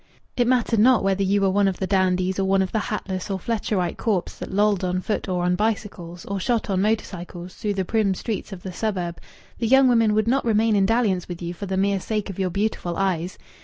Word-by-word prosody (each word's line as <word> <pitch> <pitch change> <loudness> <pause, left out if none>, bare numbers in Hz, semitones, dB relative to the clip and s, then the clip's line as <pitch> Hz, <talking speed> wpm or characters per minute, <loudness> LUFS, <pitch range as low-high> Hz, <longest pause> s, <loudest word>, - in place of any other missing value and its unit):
It 245 -1 +2
mattered 240 -3 +2
not 245 +1 +5
whether 195 0 +1
you 200 +1 +2
were 195 - +3
one 200 +1 +3
of 190 -2 -1
the 190 - -2
dandies 185 -1 +1
or - - +2
one 190 0 +3
of 190 - -4
the 220 - 0
hatless 195 -3 -4
or 195 - -1
Fletcherite 200 -3 -2
corps 205 -7 -1
that - - -6
lolled 205 -1 +2
on 180 0 0
foot 205 +1 -3
or 180 -1 0
on 180 0 +2
bicycles, 195 -5 -3
or 200 0 -3
shot 230 0 0
on 190 -1 +1
motor 215 +2 +1
cycles, 175 0 -9
through 210 -3 -3
the 190 -1 -1
prim 210 -2 +1
streets 210 0 -4
of 185 -2 -8
the 185 - -6
suburb 180 -4 -3 0.4
the 230 - 0
young 265 +2 +6
women 230 -3 +3
would 215 0 +1
not 265 +3 +2
remain 225 -1 +2
in 195 -1 +3
dalliance 210 -6 +1
with 175 -1 -6
you 175 0 -4
for 200 +3 -7
the 190 0 -2
mere 195 0 +2
sake 210 +1 -3
of 195 - -10
your 190 -1 +1
beautiful 180 -2 -2
eyes. 185 -2 -1
195 Hz, 240 wpm, -23 LUFS, 185-215 Hz, 0.4 s, young